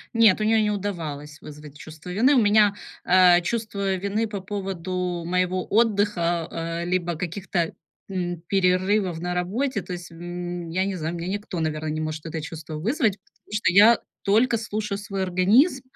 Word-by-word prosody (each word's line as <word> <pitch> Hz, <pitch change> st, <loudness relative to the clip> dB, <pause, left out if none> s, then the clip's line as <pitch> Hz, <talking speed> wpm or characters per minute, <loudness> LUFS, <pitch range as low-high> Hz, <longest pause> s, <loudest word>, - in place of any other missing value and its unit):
Нет, 220 Hz, -3 st, +5 dB
у -, -, +1 dB
неё 220 Hz, 0 st, +3 dB
не 210 Hz, -, +1 dB
удавалось 165 Hz, -7 st, -4 dB
вызвать 150 Hz, -1 st, -11 dB
чувство 155 Hz, +3 st, -11 dB
вины. 250 Hz, +10 st, +3 dB
У 245 Hz, -, +5 dB
меня, 205 Hz, -1 st, +4 dB, 0.3 s
э, 180 Hz, -1 st, +6 dB
чувство 200 Hz, -1 st, -2 dB
вины 200 Hz, +4 st, -1 dB
по 200 Hz, -3 st, -5 dB
поводу 185 Hz, -3 st, -3 dB
моего 180 Hz, +1 st, 0 dB
отдыха, 200 Hz, -6 st, +1 dB
э, 165 Hz, +1 st, -3 dB
либо 175 Hz, -1 st, -1 dB
каких-то, 175 Hz, 0 st, -2 dB, 0.4 s
м, 175 Hz, -3 st, -3 dB
перерывов 185 Hz, -1 st, +1 dB
на 180 Hz, +1 st, -3 dB
работе. 205 Hz, +6 st, -1 dB
То 180 Hz, -, -7 dB
есть, 175 Hz, -1 st, -8 dB
м, 175 Hz, 0 st, -6 dB
я 185 Hz, +3 st, 0 dB
не 195 Hz, -1 st, -2 dB
знаю, 160 Hz, +2 st, -3 dB
у -, -, -5 dB
меня 170 Hz, +2 st, -4 dB
никто, 200 Hz, -3 st, -4 dB
наверное, 155 Hz, 0 st, -2 dB
не 155 Hz, 0 st, -3 dB
может 155 Hz, 0 st, -4 dB
это 160 Hz, 0 st, -4 dB
чувство 155 Hz, +1 st, -7 dB
вызвать, 220 Hz, -, 0 dB
потому 205 Hz, -, -28 dB
что 210 Hz, -4 st, +2 dB
я 215 Hz, +4 st, +7 dB, 0.2 s
только 230 Hz, +4 st, +3 dB
слушаю 210 Hz, -2 st, -3 dB
свой 195 Hz, -2 st, -3 dB
организм, 215 Hz, -, +3 dB
185 Hz, 175 wpm, -24 LUFS, 170-205 Hz, 0.4 s, я